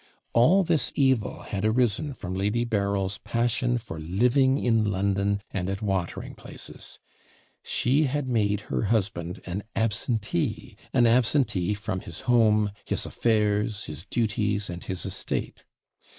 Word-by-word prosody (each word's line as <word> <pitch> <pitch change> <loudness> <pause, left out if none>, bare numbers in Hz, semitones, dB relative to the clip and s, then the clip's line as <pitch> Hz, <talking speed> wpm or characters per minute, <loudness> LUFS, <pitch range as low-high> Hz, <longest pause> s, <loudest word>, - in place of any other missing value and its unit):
All 170 +12 +5
this 160 -7 +1
evil 130 -6 +1
had 100 -1 -4
arisen 120 +5 +1
from 90 -5 -6
Lady 105 +5 0
Berryl's 100 -3 -1
passion 120 +1 0
for 100 -9 -7
living 125 - +3
in 115 -5 +2
London 100 +1 0
and 95 -1 -2
at 95 +3 -3
watering 95 -4 -2
places. - - -9 0.6
She 140 +5 +2
had 140 0 -1
made 105 -4 +1
her 110 - -2
husband 95 -5 -1
an 95 +2 -3
ABSENTEE 110 -3 -1 0.2
an 120 -2 +4
absentee 115 -5 +2
from 100 -2 -3
his 85 -2 -7
home, 110 -4 +3
his - - -2
affairs, 105 -1 +1
his 80 +3 -6
duties, 105 -3 0
and 85 0 -7
his 95 -1 -3
estate. - - -3
105 Hz, 135 wpm, -26 LUFS, 100-120 Hz, 0.6 s, All